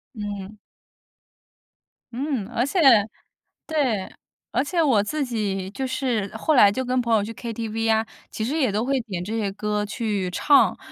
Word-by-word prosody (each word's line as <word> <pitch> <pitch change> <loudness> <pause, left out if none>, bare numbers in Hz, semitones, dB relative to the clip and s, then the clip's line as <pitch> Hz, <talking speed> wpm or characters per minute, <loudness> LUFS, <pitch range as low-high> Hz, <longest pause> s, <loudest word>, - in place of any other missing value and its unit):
嗯。 205 -1 -6 1.6
嗯， 265 -6 -2
而 240 0 0
且 285 +8 -1 0.9
对， 260 -11 0 0.4
而 250 - +1
且 335 +3 0
我 250 -9 +4
自 290 +7 -2
己 200 -6 -2
就 265 +4 -3
是 250 -6 -1
后 310 - +1
来 205 -7 +7
就 260 +5 -3
跟 250 0 +1
朋 235 - -2
友 205 - +2
去 225 - -6
KTV 225 -1 -3
啊， 220 0 +2 0.2
其 220 - -4
实 275 - -2
也 265 -9 +2
都 215 +4 -1
会 270 -1 +1
点 185 -6 -5
这 215 +4 -4
些 205 -3 -1
歌 210 +1 -2
去 205 -3 -2
唱。 280 +10 +4
225 Hz, 185 characters per minute, -24 LUFS, 205-260 Hz, 1.6 s, 来